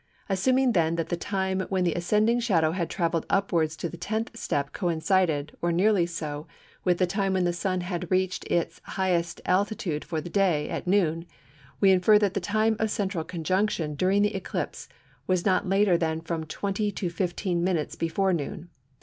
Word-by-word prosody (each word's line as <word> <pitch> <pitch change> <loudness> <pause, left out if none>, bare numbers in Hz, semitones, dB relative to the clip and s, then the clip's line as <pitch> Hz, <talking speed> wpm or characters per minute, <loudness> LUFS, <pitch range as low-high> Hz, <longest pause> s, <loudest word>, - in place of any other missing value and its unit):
Assuming 255 +7 +3
then 165 -5 +2
that 165 -1 -2
the 175 - 0
time 190 +1 -2
when 190 -2 +1
the 170 -2 +1
ascending 210 +7 +2
shadow 170 -10 +2
had 170 -1 -2
travelled 165 -2 -1
upwards 165 -5 +1
to 170 - -3
the 175 - -9
tenth 220 +6 -3
step 145 -10 -2
coincided, 165 -4 0
or 175 - +1
nearly 185 0 +3
so, 155 -3 -5 0.4
with 180 -1 +2
the 185 - +3
time 195 +1 -1
when 185 -1 +1
the 175 0 +1
Sun 185 +1 -1
had 175 -1 -4
reached 185 0 0
its 170 - -1
highest 175 -3 -1
altitude 185 -5 0
for 160 -3 -3
the 155 - -7
day, 175 -5 +1
at - - -4
noon, 170 -3 +1 0.5
we 195 -1 +6
infer 190 +3 +5
that 205 -2 +1
the 200 - 0
time 215 +4 +1
of 220 - +1
central 195 -5 -1
conjunction 175 -1 -1
during 190 +7 +2
this 210 +1 +1
eclipse 190 -2 -4 0.4
was 185 -2 +1
not 185 -1 +2
later 195 -3 +3
than 160 -1 0
from 165 -1 -4
20 200 +5 -2
to 180 -3 -3
15 175 0 -1
minutes 175 -4 -1
before 185 +3 0
noon. 170 +2 -4
180 Hz, 185 wpm, -27 LUFS, 165-195 Hz, 0.5 s, we